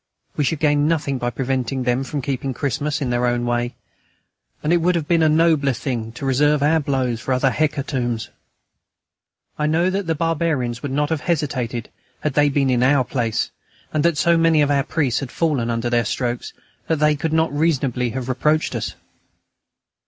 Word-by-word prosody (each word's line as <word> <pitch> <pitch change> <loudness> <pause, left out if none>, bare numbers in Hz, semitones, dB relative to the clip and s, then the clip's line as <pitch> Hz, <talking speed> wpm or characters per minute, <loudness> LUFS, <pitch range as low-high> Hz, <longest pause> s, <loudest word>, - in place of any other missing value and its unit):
We 150 - +1
should 160 - 0
gain 145 0 +2
nothing 145 -5 0
by 120 - -1
preventing 130 0 -2
them 125 +1 +1
from 140 0 -4
keeping 135 -1 -3
Christmas 145 +3 -2
in 125 - -2
their 120 0 +1
own 120 0 0
way, 120 0 -1 0.9
and 155 +3 +2
it - - +5
would 175 +2 +2
have 160 -3 -2
been 170 -1 +3
a 155 - +4
nobler 155 -3 +3
thing 115 -3 -3
to 135 - -6
reserve 145 +2 +2
our 160 +2 +4
blows 130 -5 -1
for 130 - -1
other 130 +1 +2
hecatombs. 130 -6 -1 1.3
I 150 - +1
know 170 +4 +2
that 195 -1 -2
the 165 - +1
barbarians 150 -7 -1
would 145 - -4
not 145 +2 0
have 160 -3 0
hesitated 130 -8 -2 0.3
had 150 - -1
they 145 +1 +4
been 135 -2 +1
in 125 -1 +2
our 135 +1 +4
place, 120 -3 -1 0.4
and 155 -1 +1
that 170 -3 +2
so 170 +3 +3
many 165 -2 +4
of 145 - +1
our 140 -1 +2
priests 140 -5 0
had 135 - -5
fallen 140 -8 0
under 115 +1 -1
their 120 -1 +1
strokes 120 +2 -2 0.4
that 160 - +1
they 150 0 +3
could 160 +2 -2
not 160 -2 +1
reasonably 135 -5 +1
have 125 +1 -4
reproached 150 +4 +1
us. - - -3
140 Hz, 190 wpm, -21 LUFS, 125-155 Hz, 1.3 s, it